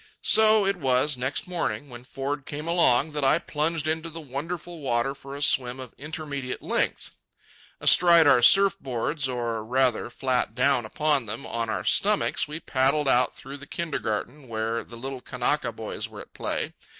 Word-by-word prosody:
So 220 -1 +5
it 195 -1 0
was, 135 -1 +1
next 130 +6 -2
morning, 145 -9 -3
when 120 -1 -11
Ford 135 +1 -4
came 150 +2 -6
along, 160 -4 +3
that 150 -1 -3
I 135 +3 +4
plunged 155 -1 -2
into 160 +1 -2
the 165 +1 -8
wonderful 165 +4 -6
water 130 -1 0
for 135 0 -10
a 145 - -4
swim 125 -2 +3
of 130 -2 -9
indeterminate 145 -3 -5
length. - - -1 0.7
Astride 170 -2 +6
of 145 - +7
our 120 - +3
surf 195 +9 +6
boards, 130 +3 -2
or, 120 -3 -3
rather, 125 0 +1
flat 125 -3 -1
down 125 -2 +2
upon 145 -1 0
them 110 +6 -4
on 115 -1 -3
our 95 -4 -2
stomachs, 200 - +2
we 150 +2 -6
paddled 140 0 +1
out 125 -1 +2
through 140 +1 -9
the 140 0 -12
kindergarten 145 -4 -4
where 115 0 -2
the 120 - -12
little 130 +1 -6
Kanaka 125 0 -1
boys 110 -1 -6
were - - -10
at - - -15
play. - - -2
135 Hz, 175 wpm, -26 LUFS, 125-155 Hz, 0.7 s, of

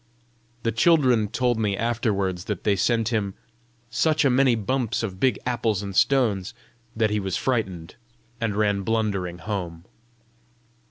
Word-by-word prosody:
The 115 - +1
children 125 -4 +3
told 120 +1 0
me 100 -3 0
afterwards 100 -6 -1
that 105 -5 -4
they 105 - +2
sent 115 +3 +1
him 105 -5 -1 0.6
"such 155 +6 +2
a 135 - +4
many 130 -1 +4
bumps 120 +2 -1
of 95 -4 -5
big 130 -3 +2
apples 115 -5 0
and 100 -1 -6
stones" 110 -9 +2 0.4
that 110 -1 +1
he 105 - +1
was 95 -2 -2
frightened, 95 -10 -2 0.5
and 115 -3 -1
ran 105 -1 +1
blundering 100 -5 -1
home. 85 -4 -5
110 Hz, 145 wpm, -24 LUFS, 100-120 Hz, 0.6 s, a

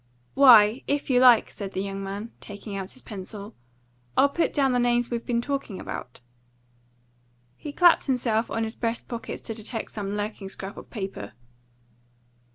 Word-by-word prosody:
"Why, 240 -3 +7
if 285 -1 -1
you 250 - +5
like," 250 -3 +6
said 200 -1 -7
the 190 - -2
young 195 0 -5
man, 200 +4 -6
taking 205 0 -8
out 195 -1 -4
his 260 - -10
pencil, 205 0 -8 0.6
"I'll 280 - +6
put 330 +4 0
down 275 -3 +2
the 250 - +2
names 240 0 +1
we've 235 -1 -2
been 235 -1 0
talking 275 -9 -3
about." 125 0 -7 1.3
He 295 - -7
clapped 345 +3 +5
himself 240 -4 0
on 225 - -1
his 220 0 -3
breast 230 -1 -2
pockets 235 -1 -6
to 225 - -5
detect 220 +1 -5
some 205 -1 -4
lurking 205 -2 -4
scrap 195 +1 -7
of - - -11
paper. 195 - -6
225 Hz, 165 wpm, -26 LUFS, 200-250 Hz, 1.3 s, Why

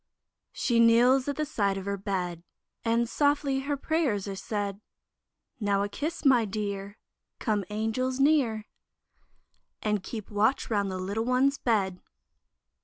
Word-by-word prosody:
She 235 -2 +1
kneels 245 +3 +5
at 285 - -1
the 305 - -1
side 200 -7 0
of 190 - -6
her 200 0 -1
bed, 185 -4 -3 0.4
And 230 +1 +2
softly 285 0 +1
her 285 +1 -2
prayers 275 - 0
are 195 - -4
said; 205 0 -3 0.8
Now, 200 -2 +1
a 205 - -2
kiss, 305 +10 -4
my 255 -4 +6
Dear; 200 -1 -4 0.4
Come, 210 -4 0
Angels, 225 +5 -1
near, 270 -7 +3 1.2
And 210 -2 0
keep 215 +2 -7
watch 220 +5 +1
round 200 -2 +1
the 185 - -3
little 200 +5 -2
one's 260 +3 +2
bed. 195 -6 0
220 Hz, 140 wpm, -28 LUFS, 200-260 Hz, 1.2 s, my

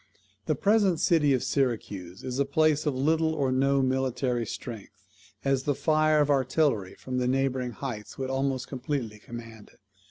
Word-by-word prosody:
The - - +2
present 205 -5 +3
city 150 -4 +3
of 130 -3 +2
Syracuse 105 -9 -2
is 130 +1 -3
a - - +4
place 155 +1 +2
of 145 - +1
little 160 +4 +1
or 135 -4 0
no 135 +1 +2
military 130 -2 0
strength, 115 -2 -8 0.4
as 135 -1 +2
the 145 -2 +1
fire 155 +1 +3
of 145 0 +2
artillery 130 -6 +1
from 125 -1 -4
the 125 - 0
neighbouring 130 -1 0
heights 110 -4 -6
would 130 0 -3
almost 135 -1 -1
completely 125 -5 -4
command 115 -1 -10
it. - - -27
135 Hz, 165 wpm, -27 LUFS, 125-145 Hz, 0.4 s, a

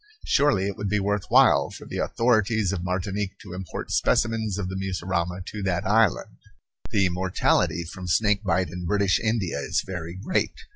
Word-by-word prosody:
Surely 140 -10 +3
it 100 -1 -3
would 100 -1 -3
be 105 +1 +1
worth 100 0 -1
while - - +5
for - - -11
the - - -5
authorities 110 -4 +1
of 85 -3 -3
Martinique 95 +2 -2
to 90 -3 -11
import 90 -1 -6
specimens 110 -3 +1
of 100 -3 -3
the 95 - -5
mussurama 90 -1 -2
to 105 - -6
that 90 -3 -1
island. 105 -1 +2 0.5
The 100 -3 +2
mortality 90 -2 +1
from 90 +2 -8
snake 105 +3 +2
bite 90 -3 0
in 90 0 -5
British 100 0 +2
India 110 -9 -1
is 70 - -1
very 90 -2 -6
great. 100 - -1
95 Hz, 175 wpm, -25 LUFS, 90-105 Hz, 0.5 s, while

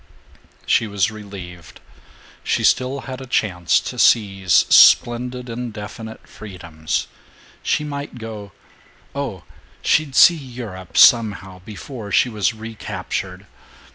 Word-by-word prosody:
She 110 - +2
was 100 0 0
relieved. 95 -5 -11 0.6
She - - -1
still 130 +2 +1
had 130 0 -8
a 130 - -9
chance 90 -8 +1
to - - -7
seize 95 -5 +2 0.2
splendid 125 +1 +4
indefinite 115 -2 -8
freedoms. 85 -6 -5 0.6
She - - 0
might 140 -3 -6
go 110 -3 -8 0.6
oh, 135 - -5 0.4
she'd 150 -3 +1
see 175 - +8
Europe, 120 - -8
somehow, 100 -7 +4
before 110 0 -9
she 125 - +3
was 105 -6 0
recaptured. 110 0 -6
110 Hz, 110 wpm, -20 LUFS, 95-125 Hz, 0.6 s, see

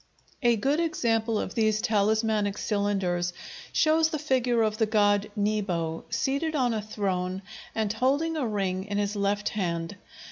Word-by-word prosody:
] - - -32
A - - +3
good 275 +8 +1
example 230 -9 +1
of - - -4
these 215 -2 +2
talismanic 215 -1 +1
cylinders 195 -5 0 0.4
shows 320 0 +3
the 315 - -2
figure 255 -5 +1
of 215 0 -1
the 220 - +3
god 205 -1 +2
Nebo, 195 -6 -1
seated 280 +7 -1
on 250 -4 +2
a 215 - -1
throne 190 -3 -2 0.3
and 215 -2 0
holding 280 +8 +1
a 285 -6 -1
ring 190 -3 -1
in 205 0 -3
his 205 0 -1
left 205 +1 0
hand. 175 -2 -3
215 Hz, 155 wpm, -27 LUFS, 200-235 Hz, 0.4 s, A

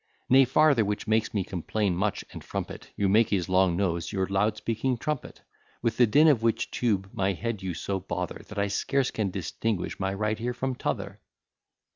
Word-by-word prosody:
Nay, 135 +1 +7
farther, 140 -2 +4
which 105 0 -2
makes 110 0 +2
me 100 -3 0
complain 95 +1 -1
much, 100 +3 -1
and - - -9
frump - - -4
it, - - -10
You 100 - +1
make 110 +3 +4
his 95 -4 0
long 95 -2 +3
nose 85 -3 -1
your 95 -1 0
loud 105 +3 +1
speaking 115 +3 -1
trumpet; 150 +2 -4 0.4
With 115 -2 0
the 120 - +6
din 150 +9 +5
of 140 -7 +4
which 115 -1 0
tube 100 -5 0
my 95 0 0
head 115 +2 -4
you 95 -3 -3
so 95 +3 -2
bother, 90 -1 -4
That 105 - -10
I 100 - +2
scarce 130 +6 0
can 105 -3 -1
distinguish 95 +2 -3
my 95 0 -1
right 110 +2 -1
ear 120 +1 -2
from 130 +1 -2
t'other. - - -4
105 Hz, 200 wpm, -27 LUFS, 95-115 Hz, 0.4 s, Nay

